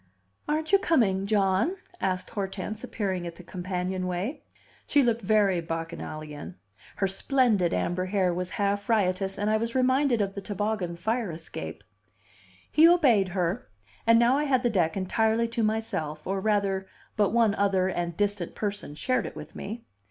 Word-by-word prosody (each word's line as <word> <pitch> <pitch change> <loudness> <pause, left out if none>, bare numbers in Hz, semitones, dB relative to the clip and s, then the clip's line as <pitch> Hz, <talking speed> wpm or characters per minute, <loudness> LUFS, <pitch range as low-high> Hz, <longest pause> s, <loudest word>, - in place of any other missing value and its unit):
"Aren't 310 +2 -1
you 395 - +6
coming, 200 - +2
John?" 200 - +2 0.2
asked 185 -1 -2
Hortense, 200 +2 -4
appearing 190 -5 -2
at 170 - -7
the 180 - -12
companionway. 185 - -3 0.5
She 285 - +4
looked 235 -1 +1
very 200 -3 +3
bacchanalian. 165 -1 -6 0.4
Her 195 - +1
splendid 210 -3 +2
amber 175 - -1
hair 185 -2 +1
was 180 +1 -2
half 200 +2 0
riotous, 195 -3 +1
and 205 +1 -1
I 215 0 +3
was 230 +2 -3
reminded 260 -1 +3
of 195 -1 0
the 200 - -5
toboggan 205 -3 -2
fire 220 +3 -1
escape. 100 - -7 0.9
He 315 +2 +7
obeyed 265 - +5
her; 180 +5 -1 0.4
and 230 0 +7
now 240 +3 +4
I 300 - 0
had 260 -3 +2
the 240 - +2
deck 175 -4 +1
entirely 220 +4 +1
to 230 0 -2
myself, 215 -9 -2
or, 195 +1 -1
rather, 195 -2 +1 0.3
but 205 -2 +3
one 230 -3 +3
other 195 -2 +2
and 175 -2 -2
distant 205 -4 -1
person 205 -8 -4
shared 255 - 0
it - - -9
with - - -9
me. 225 +3 -6
200 Hz, 160 wpm, -27 LUFS, 180-225 Hz, 0.9 s, He